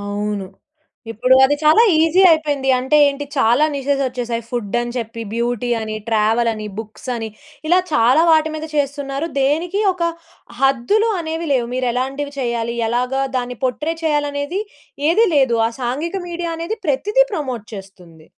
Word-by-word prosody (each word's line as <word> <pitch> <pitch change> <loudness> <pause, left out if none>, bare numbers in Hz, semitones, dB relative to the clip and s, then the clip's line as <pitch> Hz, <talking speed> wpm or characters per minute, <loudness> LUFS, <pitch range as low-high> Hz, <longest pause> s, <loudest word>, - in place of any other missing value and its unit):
అవును. 205 -1 -3 0.7
ఇప్పుడు 250 +4 +3
అది 290 +2 +2
చాలా 310 +9 +6 0.2
ఈజీ 325 +3 +3
అయిపోయింది. 290 -4 +1
అంటే 265 +4 +1
ఏంటి, 285 +1 -4
చాలా 245 +4 +4
నిషెస్ 275 0 -1
వచ్చేశాయి 240 -2 -3
ఫుడ్డని 240 +1 -2
చెప్పి, 230 0 -5
బ్యూటీ 240 +1 -2
అని, 215 0 -4
ట్రావెలని, 220 0 +1
బుక్స్ 220 +3 -9
అని 225 -1 -4 0.4
ఇలా 360 - +5
చాలా 260 +3 +4
వాటి 315 0 +3
మీద 310 0 -5
చేస్తున్నారు. 285 +1 -2
దేనికి 330 +9 0
ఒక 360 - -6 0.6
హద్దులు 275 - +2
అనేవి 325 0 -4
లేవు. 250 -3 +1
మీరు 255 -1 0
ఎలాంటివి 275 +3 -3
చేయాలి, 235 -1 -2
ఎలాగా 250 +3 0
దాన్ని 250 -1 -3
పోట్రే 300 +6 -1
చేయాలనేది 295 +4 -1 0.5
ఏదీ 445 +6 +4
లేదు. 260 -5 +3
ఆ - - 0
సాంఘిక 295 +10 -2
మీడియా 340 -1 -4
అనేది 340 +7 -4
ప్రతిదీ 420 - +2
ప్రమోట్ 260 - -4
చేస్తుంది. 180 -5 -13
265 Hz, 145 wpm, -19 LUFS, 235-310 Hz, 0.7 s, చాలా